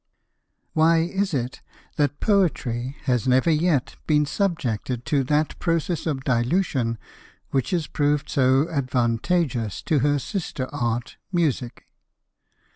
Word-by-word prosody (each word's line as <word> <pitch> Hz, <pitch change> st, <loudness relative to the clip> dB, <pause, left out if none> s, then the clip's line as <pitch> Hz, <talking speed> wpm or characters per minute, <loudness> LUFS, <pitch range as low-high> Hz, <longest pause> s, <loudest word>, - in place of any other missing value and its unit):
[Why 160 Hz, +1 st, +4 dB
is 190 Hz, +3 st, -1 dB
it 125 Hz, -4 st, -3 dB, 0.4 s
that 145 Hz, -1 st, +1 dB
Poetry 135 Hz, -, +1 dB
has 125 Hz, -4 st, 0 dB
never 130 Hz, +6 st, +4 dB
yet 155 Hz, -4 st, +1 dB
been 150 Hz, -1 st, +3 dB
subjected 130 Hz, -, -2 dB
to 145 Hz, -4 st, +1 dB
that 150 Hz, +3 st, 0 dB
process 165 Hz, 0 st, -1 dB
of 135 Hz, -4 st, -2 dB
Dilution 125 Hz, -1 st, +1 dB, 0.5 s
which 135 Hz, -2 st, 0 dB
has 175 Hz, -5 st, 0 dB
proved 145 Hz, -1 st, 0 dB
so 135 Hz, +2 st, +3 dB
advantageous 125 Hz, -, 0 dB
to 155 Hz, -, +2 dB
her 145 Hz, +2 st, +2 dB
sister 145 Hz, -, -4 dB
art 120 Hz, -4 st, -2 dB
Music? 145 Hz, -9 st, -1 dB
145 Hz, 120 wpm, -24 LUFS, 125-165 Hz, 0.5 s, Why